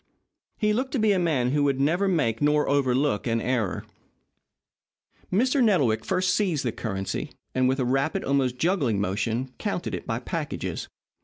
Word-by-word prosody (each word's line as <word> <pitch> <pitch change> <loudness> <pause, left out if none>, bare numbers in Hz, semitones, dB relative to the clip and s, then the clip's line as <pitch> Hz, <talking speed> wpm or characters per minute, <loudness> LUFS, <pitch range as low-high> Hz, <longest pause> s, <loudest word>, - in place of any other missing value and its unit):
He 210 -1 +2
looked 260 +4 -2
to - - +1
be 215 -1 +3
a 195 - +2
man 140 -8 +1
who 145 +1 +2
would 135 -2 +1
never 170 +8 +2
make 125 - +1
nor 150 0 +3
overlook 135 -4 +1
an 115 0 +1
error. 115 -5 -1 1.5
Mr. 255 +7 +3
Nettlewick 140 - +2
first 185 0 +1
seized 180 -10 0
the 120 - +1
currency, 95 -5 -4 0.2
and 130 0 +2
with 130 +1 0
a 130 - +1
rapid, 135 +5 0
almost 135 -2 +1
juggling 145 - +1
motion, 110 +6 -2
counted - - -3
it - - -5
by - - -1
packages. - - -4
140 Hz, 165 wpm, -26 LUFS, 125-180 Hz, 1.5 s, be